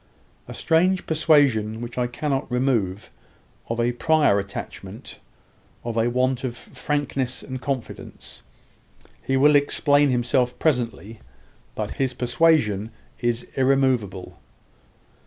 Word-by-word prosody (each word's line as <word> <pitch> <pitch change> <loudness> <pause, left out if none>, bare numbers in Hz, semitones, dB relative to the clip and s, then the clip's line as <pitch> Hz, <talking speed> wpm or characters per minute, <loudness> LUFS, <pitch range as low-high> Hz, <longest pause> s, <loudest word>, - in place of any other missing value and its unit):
A - - -8
strange 180 +3 +2
persuasion 140 -9 +2
which 120 0 -7
I 125 -1 0
cannot 135 +2 -3
remove, 115 -7 -1 0.6
of 115 0 -2
a 120 +1 +2
prior 145 -5 +3
attachment 100 0 -8 0.6
of 120 -1 -4
a 115 +1 +2
want 130 +1 0
of 120 -2 -4
frankness 140 -3 -3
and 130 -1 -7
confidence. 130 -2 -6 0.8
He 135 - 0
will 145 +2 +5
explain 145 0 +3
himself 125 0 +1
presently. 115 - -1 0.6
But - - -3
his 130 -2 0
persuasion 120 -5 +2 0.3
is 120 0 -1
irremoveable." 130 -8 0
125 Hz, 110 wpm, -23 LUFS, 115-145 Hz, 0.8 s, will